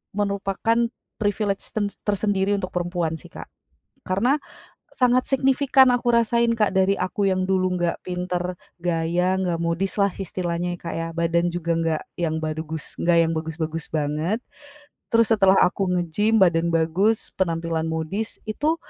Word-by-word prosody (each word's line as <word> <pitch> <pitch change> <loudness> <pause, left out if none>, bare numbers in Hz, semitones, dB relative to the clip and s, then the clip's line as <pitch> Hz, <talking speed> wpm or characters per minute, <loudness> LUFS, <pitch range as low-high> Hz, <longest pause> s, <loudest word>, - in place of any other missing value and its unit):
merupakan 205 +3 0 0.3
privilege 205 -1 0
ten 205 -2 0 0.2
tersendiri 205 -1 +1
untuk 185 -2 -4
perempuan 175 -2 -1
sih, - - -13
Kak. - - -9 0.6
Karena 220 +10 +2 0.6
sangat 250 0 +2
signifikan 270 0 +4
aku 245 0 0
rasain, 235 0 +3
Kak, 210 -3 +2
dari 190 +1 +4
aku 185 +2 -1
yang 185 0 +1
dulu 185 -1 +1
nggak 175 -1 -1
pinter 180 0 -2 0.3
gaya, 175 +1 +1
nggak 180 -3 0
modis 170 +3 0
lah 200 - +4
istilahnya 175 -2 -3
ya, - - -29
Kak, 170 - -5
ya, 165 0 -2
badan 170 +1 +1
juga 170 -1 -2
nggak 165 -2 0 0.4
bad 155 0 -3 0.6
yang 165 0 +1
bagus-bagus 160 0 -4
banget. 155 +6 0 0.8
Terus 230 -1 +4
setelah 195 -3 +5
aku 195 +1 0
nge-gym 180 +6 +1
badan 170 -2 +3
bagus 170 +7 +1
penampilan 165 -2 -1
modis 160 +7 -3
itu, 300 +9 0
185 Hz, 140 wpm, -23 LUFS, 170-210 Hz, 0.8 s, setelah